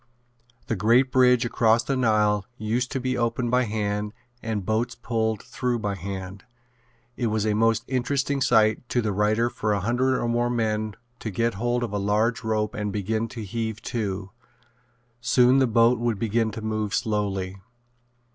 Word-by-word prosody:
The 115 - -1
great 120 +6 +3
bridge 125 -2 +4
across 115 -1 +3
the 135 - -1
Nile 105 -4 +2
used 120 +3 -1
to 135 - -1
be 130 0 -1
opened 120 0 -1
by 125 0 +3
hand 105 -1 -2 0.3
and 110 -4 -3
boats 110 +4 0
pulled 110 -3 -2
through 125 -1 -2
by 105 -3 -2
hand. 95 0 -6 0.7
It 120 - -1
was 110 -1 0
a 105 - +2
most 115 +1 +2
interesting 135 +2 0
sight 110 -1 +3
to 120 - +1
the 105 - 0
writer 105 +4 +2
for 110 -3 -1
a 100 - 0
hundred 125 +5 +1
or - - -1
more 120 +1 +1
men 110 -3 -1 0.2
to 110 - -4
get 115 +4 0
hold 120 +4 -1
of 110 -4 -4
a 105 - 0
large 105 +4 +1
rope 110 -1 -1
and 105 -1 -3
begin 110 +3 -1
to 115 -1 -7
heave 110 +1 -3
to. 100 -4 -3 0.9
Soon 125 +1 +4
the 130 - +4
boat 115 +1 +4
would 120 -3 0
begin 115 +1 0
to 110 0 -7
move 110 -2 -1
slowly. 100 -3 -1
110 Hz, 175 wpm, -25 LUFS, 105-120 Hz, 0.9 s, bridge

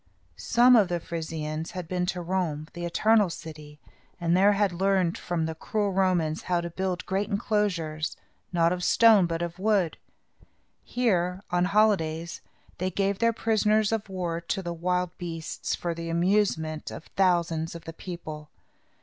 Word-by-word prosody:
Some 245 +1 +5
of 210 -5 +5
the 175 -1 -1
Frisians 160 -1 -5
had 180 -3 -5
been 180 0 -1
to 180 -1 -2
Rome, 170 -4 -2
the 175 0 -5
Eternal 210 +3 +3
City, 150 -2 -9 0.4
and 170 0 +2
had 200 +1 +4
there - - -8
learned, 190 -3 +2
from 170 -2 -2
the 160 - -3
cruel 205 +5 -2
Romans, 180 -4 +1
how 175 -1 0
to 170 0 -5
build 185 0 -3
great 195 +3 -1
enclosures, 185 -7 -1 0.3
not 170 -1 +3
of 180 0 -4
stone 215 -3 +6
but 165 0 -2
of 170 +1 -5
wood. 195 -5 +1 0.9
Here, 185 -6 0
on 175 0 +2
holidays, 175 -5 +1 0.4
they 185 +1 0
gave 195 +1 -1
their 230 0 +3
prisoners 215 -1 +2
of 220 -3 -2
war 175 -3 -3
to 190 +3 -3
the 175 -1 -3
wild 180 +1 -1
beasts, 165 -2 -4
for 170 -1 -3
the 165 0 -6
amusement 170 -3 0
of - - -8
thousands 170 -3 +1
of 165 -1 -9
the 165 - -7
people. 155 -4 -8
180 Hz, 160 wpm, -27 LUFS, 165-195 Hz, 0.9 s, stone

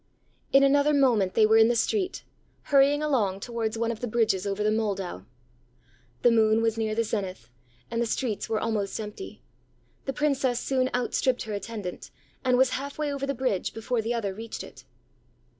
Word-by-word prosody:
ã - - -40
In 275 - +5
another 285 +2 +4
moment 230 -9 +3
they 220 - +6
were 220 +1 +5
in 220 - +7
the 240 - +2
street, 375 - -1 0.4
hurrying 285 +1 +4
along 215 -11 +1
towards 230 0 -3
one 230 0 0
of 225 - -6
the 245 - -3
bridges 215 -4 +1
over 200 +1 -1
the 215 - +2
Moldau. 195 - -2 1.0
The 240 - +6
moon 220 0 +3
was 225 -1 +1
near 220 -1 -1
the 230 - +2
zenith, 195 - -4 0.4
and 230 0 -1
the 235 - 0
streets 225 -2 -2
were 220 -1 0
almost 215 -3 -2
empty. 215 - -8 0.6
The 270 - -2
Princess 270 -5 +1
soon 260 -1 0
outstripped 250 +1 0
her 215 - -5
attendant, 205 -3 -6 0.3
and 255 -1 +3
was 260 0 +4
half 280 +1 -4
way 300 -2 -1
over 275 0 -3
the 275 - -1
bridge, 240 -7 -1
before 225 +1 -1
the 230 +2 -2
other 205 -4 -2
reached 225 +3 -7
it. 130 - -13
230 Hz, 190 wpm, -27 LUFS, 215-265 Hz, 1.0 s, in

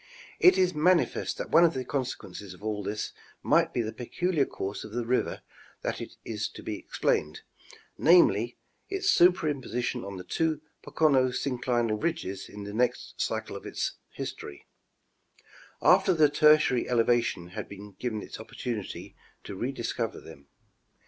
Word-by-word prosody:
It 365 - +7
is 185 -1 +3
manifest 170 +3 +2
that - - -5
one 165 - +7
of 165 -4 +4
the 130 -1 -3
consequences 105 -8 -4
of 90 - -18
all 105 -1 -2
this 105 +2 -3 0.3
might - - +3
be 120 - 0
the 110 0 -4
peculiar 145 +6 0
course 100 +2 -5
of 110 - -10
the 120 0 -2
river 125 +2 0 0.4
that - - -2 0.2
is - - -2
to - - -11
be - - -4
explained, 75 +1 -1 0.6
namely, 120 - +5 0.3
its 390 0 +1
superimposition 145 - +2
on 100 0 -6
the 90 - -7
two 160 - 0 0.2
Pocono 140 -5 +3
synclinal 120 -4 -1
ridges 100 - -3
in 105 0 -8
the 100 0 -7
next 125 +3 -1
cycle - - -2
of - - -7
its - - -2 0.2
history, 70 - -7 1.2
after - - +5
the 155 -2 +5
Tertiary 150 -4 +4
elevation 115 -7 +1
had 90 - -6 0.3
given 110 -4 -3
it - - -9
opportunity 110 -1 -6 0.3
to - - -7
re 120 +8 -2
discover 115 -3 -3
them. 70 -3 -14
120 Hz, 150 wpm, -28 LUFS, 105-150 Hz, 1.2 s, It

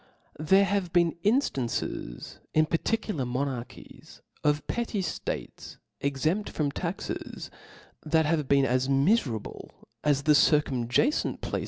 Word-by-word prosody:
nr^ 155 - -6
HERE 195 +1 +6
have 195 -3 -1
been 170 -2 +3
inftances 135 - -1 0.2
in 155 0 +5
particular 170 0 -1
■*• - - -5
monarchies, 125 -1 -6 0.2
of 150 0 +1
petty 235 -3 -2
ftates 185 - -5 0.2
exempt 155 +9 -1
from 145 -2 -1
taxeS) 175 +5 -5 0.5
thit 160 0 +2
has 155 +1 +2
been 140 0 +3
as 130 +1 +1
miferable 135 - 0 0.3
as 145 -2 +2
the 150 - +5
circum 145 -5 +3
150 Hz, 120 wpm, -27 LUFS, 135-180 Hz, 0.5 s, HERE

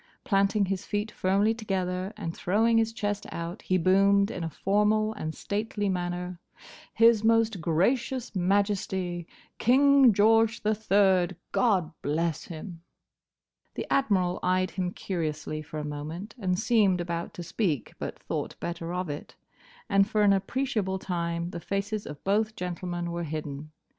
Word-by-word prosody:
Planting 200 0 +2
his 190 0 -2
feet 210 +1 -2
firmly 200 +4 +2
together, 190 -4 -2
and 170 -5 -4
throwing 225 +5 +2
his 225 0 +1
chest 205 -2 -3
out, 170 +4 -5
he 185 - +1
boomed 200 +3 +4
in 175 - -5
a 165 - -2
formal 210 +6 +1
and 160 -7 -5
stately 205 0 -2
manner, 180 -1 -3 0.6
"His 230 -1 +5
Most 225 -4 +3
Gracious 235 +9 0
Majesty, 190 -2 0 0.3
King 275 +1 +6
George 225 +2 +3
the 215 +1 +2
Third, 195 -4 +3 0.2
God 190 -9 +2
bless 160 +2 -1
him!" 165 +1 -8 0.9
The - - -3
Admiral 190 -9 +2
eyed 185 0 +1
him 185 -2 -2
curiously 155 -5 -3
for 155 0 -8
a 150 - -3
moment, 155 +8 -6
and 185 -4 0
seemed 215 -4 +3
about 170 -1 -4
to 175 - -6
speak, 170 - -2
but - - -5
thought - - -5
better 170 0 -4
of 180 0 -2
it; 145 0 -7 0.5
and 195 -2 +3
for 215 -1 +2
an 200 -1 +6
appreciable 195 -1 -1
time 170 -2 -3
the 170 - -5
faces 200 +4 -3
of 145 0 -9
both 215 +3 +1
gentlemen 175 -2 -4
were 170 0 -3
hidden. 155 -1 -5
190 Hz, 150 wpm, -28 LUFS, 175-215 Hz, 0.9 s, King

